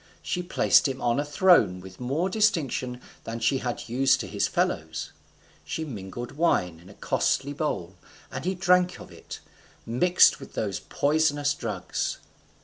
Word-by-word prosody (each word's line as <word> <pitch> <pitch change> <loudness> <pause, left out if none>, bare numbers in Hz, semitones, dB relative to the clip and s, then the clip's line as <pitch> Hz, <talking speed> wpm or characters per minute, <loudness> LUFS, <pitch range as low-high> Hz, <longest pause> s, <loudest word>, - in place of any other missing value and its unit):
She 180 - -2
placed 175 -3 +3
him 135 -1 -4
on 120 +2 +1
a - - +1
throne 145 - +4
with 95 0 -12
more 140 +9 -1
distinction 160 - 0 0.2
than 115 +1 -5
she 120 +4 +1
had 120 -1 -4
used 130 +3 +3
to - - -6
his - - 0
fellows; - - -2 0.5
she 160 - -4
mingled 120 -2 -7
wine 90 - +1
in 90 +3 -16
a 100 - -14
costly 140 +2 0
bowl, 135 - -3 0.4
and - - -5
he 185 +2 -1
drank 180 0 +2
of - - -12
it, - - -10 0.4
mixed 175 +11 +4
with - - -11
those 100 -3 -2
poisonous 145 -1 +1
drugs. 110 -9 -3
135 Hz, 155 wpm, -26 LUFS, 115-165 Hz, 0.5 s, throne